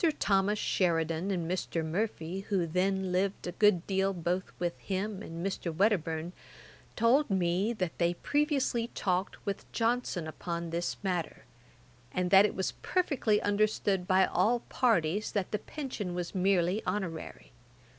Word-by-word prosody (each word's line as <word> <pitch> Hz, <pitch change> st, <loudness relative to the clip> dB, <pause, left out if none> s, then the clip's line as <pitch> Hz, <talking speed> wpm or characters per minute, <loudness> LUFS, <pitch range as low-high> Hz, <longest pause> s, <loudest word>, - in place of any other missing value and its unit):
Thomas 200 Hz, +1 st, +2 dB
Sheridan 165 Hz, -2 st, 0 dB
and 175 Hz, -4 st, -1 dB
Mr. 170 Hz, -2 st, -2 dB
Murphy, 180 Hz, 0 st, -2 dB
who 190 Hz, -4 st, +2 dB
then 190 Hz, +3 st, 0 dB
lived 190 Hz, +2 st, 0 dB
a 175 Hz, -, -3 dB
good 195 Hz, -3 st, +3 dB
deal 195 Hz, 0 st, +1 dB
both 175 Hz, +2 st, -2 dB
with 175 Hz, -1 st, -1 dB
him 200 Hz, +1 st, -3 dB
and 170 Hz, -3 st, -6 dB
Mr. 190 Hz, -3 st, -2 dB
Wedderburne, 170 Hz, -3 st, 0 dB, 0.6 s
told 245 Hz, +5 st, +3 dB
me, 190 Hz, +2 st, +1 dB
that 185 Hz, -7 st, -3 dB
they 170 Hz, 0 st, +2 dB
previously 275 Hz, -, 0 dB
talked 185 Hz, 0 st, -1 dB
with 200 Hz, -, -4 dB
Johnson 230 Hz, -7 st, 0 dB
upon 170 Hz, +2 st, -4 dB
this 170 Hz, +1 st, -2 dB
matter, 180 Hz, -4 st, -2 dB, 0.7 s
and 180 Hz, 0 st, -1 dB
that 195 Hz, +1 st, +8 dB
it -, -, -7 dB
was 190 Hz, -, -1 dB
perfectly 280 Hz, -, +1 dB
understood 205 Hz, -2 st, +1 dB
by 190 Hz, 0 st, +5 dB
all 240 Hz, +2 st, +2 dB
parties 210 Hz, -5 st, +1 dB
that 200 Hz, -3 st, -1 dB
the 210 Hz, -, 0 dB
pension 225 Hz, -10 st, -5 dB
was 175 Hz, -1 st, -4 dB
merely 190 Hz, +1 st, +2 dB
honorary. 175 Hz, -6 st, -4 dB
190 Hz, 145 wpm, -30 LUFS, 175-210 Hz, 0.7 s, that